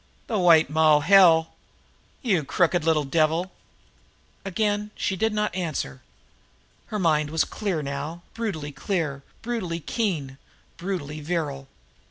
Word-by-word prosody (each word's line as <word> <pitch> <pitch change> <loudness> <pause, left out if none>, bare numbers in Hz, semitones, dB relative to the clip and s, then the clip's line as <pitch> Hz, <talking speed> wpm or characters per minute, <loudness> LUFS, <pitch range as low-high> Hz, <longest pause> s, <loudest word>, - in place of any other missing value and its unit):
The 220 -3 -1
White 165 -3 +6
Moll 155 0 +4
hell! 165 -2 +6 0.7
You 190 - +2
crooked 175 +3 +1
little 160 -2 +2
devil!" 160 +5 +1 0.9
Again 205 +2 -1
she 190 - -1
did 220 +4 +1
not 210 -3 -1
answer. 155 - -3 0.9
Her 215 - -3
mind 155 -5 +2
was 160 +1 +2
clear 190 -8 -3
now, 145 +5 -5
brutally 195 -11 -4
clear, 150 -4 -2 0.2
brutally 215 -8 -3
keen, 155 - -2 0.4
brutally 165 -5 -4
virile. 145 -4 -3
165 Hz, 120 wpm, -25 LUFS, 150-195 Hz, 0.9 s, White